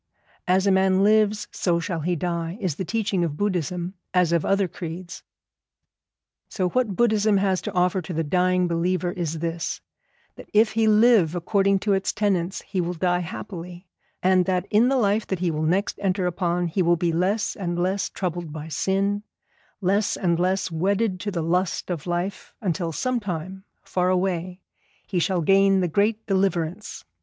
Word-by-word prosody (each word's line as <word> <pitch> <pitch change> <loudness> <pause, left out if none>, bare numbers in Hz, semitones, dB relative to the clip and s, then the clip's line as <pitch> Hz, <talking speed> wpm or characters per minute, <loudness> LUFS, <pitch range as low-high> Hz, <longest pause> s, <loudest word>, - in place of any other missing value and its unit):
As 185 +2 +3
a 200 - +4
man 190 0 +3
lives 215 0 +3
so 170 -2 0
shall 170 0 -3
he 175 +3 -1
die, 170 +1 -3
is 180 -7 -2
the - - -2
teaching 200 -2 -1
of 155 -3 -2
Buddhism 180 -2 -2 0.2
as 180 -2 +3
of 170 -2 +2
other 195 -1 +2
creeds. 175 0 -7 1.3
So 185 -3 -1
what 235 -3 0
Buddhism 215 -2 +3
has 190 -1 +1
to - - -5
offer 180 +1 +2
to 175 - -8
the 165 -1 -1
dying 180 +3 +2
believer 175 +1 0
is 165 -3 -3
this, 165 +1 -3 0.6
that - - -12
if 215 +1 +4
he 225 0 +2
live 215 -6 +5
according 195 +3 +2
to 205 - +1
its 190 0 0
tenets 190 -4 -1
he 190 -2 -2
will 175 +1 -3
die 180 +1 +1
happily, 180 0 -7 0.4
and 185 -1 +4
that 185 -1 0
in 220 +4 +5
the 270 - +2
life 210 -2 +1
that 190 - -1
he 175 -1 0
will 155 0 -3
next 180 +6 0
enter 190 -1 0
upon 175 0 0
he 175 +3 -1
will 175 0 +3
be 170 0 0
less 195 +5 0
and 175 -3 -3
less 185 +2 0
troubled 175 -3 -4
by 155 +1 -7
sin, 195 +5 0 0.6
less 200 +3 +1
and 170 -3 +1
less 185 0 0
wedded 190 +4 0
to 205 - -3
the 170 -5 -2
lust 180 +2 -1
of 170 -2 -4
life, 175 +3 -3
until 175 -4 -2
sometime, 190 - -3 0.2
far 180 0 0
away, 185 0 -1 0.4
he 180 - -1
shall 180 +1 +1
gain 195 +3 +4
the 180 - +1
great 210 +6 0
Deliverance. 190 -1 -1
185 Hz, 175 wpm, -24 LUFS, 175-200 Hz, 1.3 s, live